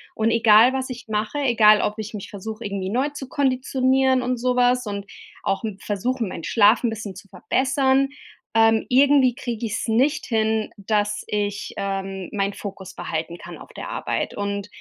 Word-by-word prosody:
Und 220 +1 +1
egal, 230 +2 +6
was 260 0 -2
ich 250 0 -7
mache, 215 +5 -2
egal 220 -6 +5
ob 210 +1 -2
ich 215 +1 -6
mich 200 - -7
versuche 215 +3 -7
irgendwie 195 -2 -3
neu 260 +7 0
zu 280 -2 -9
konditionieren 260 -1 +2
und 250 0 -1
sowas 250 -1 +2
und 200 -1 -4 0.4
auch, 195 - 0
hm, 210 -3 -4
versuche, 230 +6 -2
meinen 185 -4 -7
Schlaf 215 +4 +4
'n 240 - +2
bisschen 220 -3 -6
zu 190 +2 -12
verbessern. 265 +7 +1 0.4
Ähm, 225 0 +4
irgendwie 270 -1 +5
kriege 235 -2 -4
ich's 215 +1 -3
nicht 265 +7 +2
hin, 220 -1 0
dass 205 0 -1
ich, 205 0 -3
ähm, 195 -1 -3
mein 200 -1 0
Fokus 195 -2 -8
behalten 165 +2 -4
kann - - -10
auf - - -13
der - - -7
Arbeit. - - -3
Und 200 0 -3
220 Hz, 175 wpm, -23 LUFS, 205-255 Hz, 0.4 s, egal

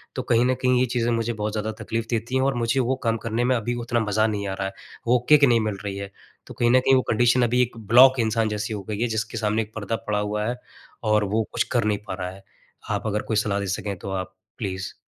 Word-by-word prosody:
तो - - -1
कहीं 120 +1 +3
न 130 0 +2
कहीं 125 -1 +3
ये 130 - +3
चीज़ें 120 -1 +1
मुझे 115 0 0
बहुत 105 -1 -3
ज़्यादा 110 0 -2
तकलीफ़ 115 0 -2
देती 120 +2 -2
हैं 130 - +3
और 135 -1 +1
मुझे 120 +2 0
वो 130 +1 +1
काम 115 -1 +1
करने 115 +1 0
में 125 +1 +2
अभी 120 +1 -2
उतना 120 -1 0
मज़ा 110 0 +1
नहीं 100 -2 -2
आ 95 - -2
रहा 95 0 -3
है, 95 - -7 0.3
वो 125 +1 +4
किक 150 -1 +7
नहीं 120 -3 +4
मिल 100 - -5
रही 100 -1 -3
है। 100 0 -6 0.4
तो - - -9
कहीं 120 - +1
न 130 - +6
कहीं 135 +1 +4
वो 130 - +4
कंडीशन 120 +2 +3
अभी 120 +1 +2
एक 120 -1 -1
ब्लॉक 125 +4 +6
इंसान 110 -1 +1
जैसी 105 +1 -3
हो 100 -2 -5
गई 105 0 -3
है, 120 - +2
जिसके 110 0 -3
सामने 110 0 +1
एक 110 0 -8
पर्दा 105 +1 -2
पड़ा 105 -1 +1
हुआ 105 +1 -2
है 125 +1 -3 0.4
और 105 -1 +3
वो 110 - +2
कुछ - - +2
कर 120 -2 +2
नहीं 105 -1 +1
पा - - -3
रहा 90 -1 -4
है। 95 +1 -14 0.5
आप - - -2
अगर 105 0 0
कोई 110 - +2
सलाह 105 -1 0
दे 100 - -3
सकें 100 -2 -4
तो 100 - -6
आप, 95 -1 -4 0.2
प्लीज़। 95 -4 -4
110 Hz, 275 wpm, -24 LUFS, 105-120 Hz, 0.5 s, किक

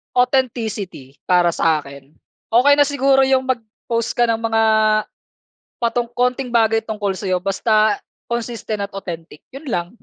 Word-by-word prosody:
Authenticity 225 - -1
para 180 -1 +4
sa'kin. 145 -4 -2 0.4
Okey 260 +5 +6
na 290 - +5
siguro 270 -1 +3
'yung 265 -1 +3
mag-post 230 -1 -3
ka 240 -1 +2
ng 225 - +2
mga 225 0 +1 1.1
patu 235 0 -1
konting 250 +1 0
bagay 225 -2 +2
tungkol 210 -3 -3
sa'yo, 185 -1 -2
basta 210 +3 +1 0.2
consistent 235 -3 -4
at - - -36
authentic 165 -5 -8
'yun 275 +2 -9
lang. 175 -6 -2
225 Hz, 130 wpm, -19 LUFS, 190-245 Hz, 1.1 s, Okey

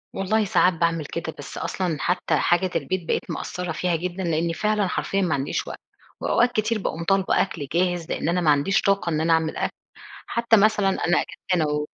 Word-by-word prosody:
والله 210 +3 +1
ساعات 185 -1 +3
باعمل 165 -2 0
كده، 160 0 -5
بس 145 - -8
أصلًا 175 -5 -2
حتّى 180 +4 0
حاجة 180 +2 +2
البيت 185 -3 -2
بقيت - - -1
مقصرة 180 -2 -4
فيها 175 +1 0
جدًا، 180 +3 -3
لأني 165 0 0
فعلًا 210 0 +1
حرفيًا 195 +2 -1
ماعنديش 145 -7 -1
وقت، - - -7 0.4
وأوقات 245 +1 +2
كتير 220 0 0
باقوم 170 -3 -3
طالبة 195 +2 +2
أكل 155 -7 -3
جاهز، 175 -1 0
لإن - - -1
أنا 180 +1 +1
ما 155 - +4
عنديش 145 +8 +2
طاقة 195 -3 +1
إن 155 -2 0
أنا 165 +1 +3
أعمل 160 -1 0
أكل، - - -2 0.5
حتّى 235 -1 +3
مثلًا 210 -1 +3
أنا 175 -2 +1
أجازتي 185 - -3
أنا 160 - +2
و 150 0 -1
180 Hz, 195 wpm, -24 LUFS, 165-195 Hz, 0.5 s, ما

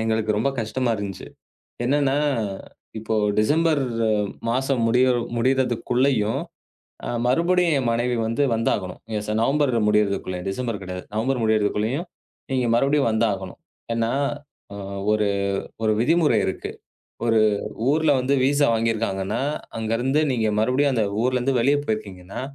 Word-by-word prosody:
எங்களுக்கு 110 -1 0
ரொம்ப 115 +6 +1
கஷ்டமா 115 +3 -1
இருந்துச்சு. 100 -2 -6 0.6
என்னன்னா, 140 +1 +2 0.8
இப்போ 110 0 -2 0.2
டிசம்பர் 155 +5 +2 0.7
மாசம் 130 0 0
முடி 125 +2 +3 0.4
முடியறதுக்குள்ளயும் 125 -1 +1 0.6
அ - - -4 0.2
மறுபடியும் 170 +4 +2
என் 130 -3 0
மனைவி 120 +1 0
வந்து 115 +6 0
வந்தாகணும். 100 -5 -1 0.2
எஸ் 105 0 -5
நவம்பர் 140 +2 +2 0.2
முடியறதுக்குள்ள, 100 -3 +1
டிசம்பர் 115 -1 -3
கிடையாது. 90 -1 -6
நவம்பர் 120 +3 0
முடியறதுக்குள்ளயும் 110 - 0 0.4
நீங்க 130 -2 +1
மறுபடியும் 135 0 +2
வந்தாகணும். 100 -4 -1 0.4
ஏன்னா 115 0 0 1.0
ஒரு 105 -1 +1 0.6
ஒரு 110 -1 +3
அ - - -2
விதிமுறை 150 -2 +3
இருக்கு. 95 - -4 0.6
ஒரு 115 -1 +3 0.5
ஊர்ல 155 +1 +3
வந்து 130 +2 +1
விஸா 145 +2 +3
வாங்கிருக்காங்கன்னா 110 -3 -1 0.4
அங்க 110 0 -3
இருந்து 135 +4 +1
நீங்க 115 -3 0
மறுபடியும் 130 +5 +2
அந்த 110 - +2 0.2
ஊர்ல 130 0 +2
இருந்து 130 +1 +1
வெளியே 140 +4 +3
போயிருக்கீங்கன்னா, 100 -2 -5
115 Hz, 120 wpm, -23 LUFS, 110-135 Hz, 1.0 s, முடி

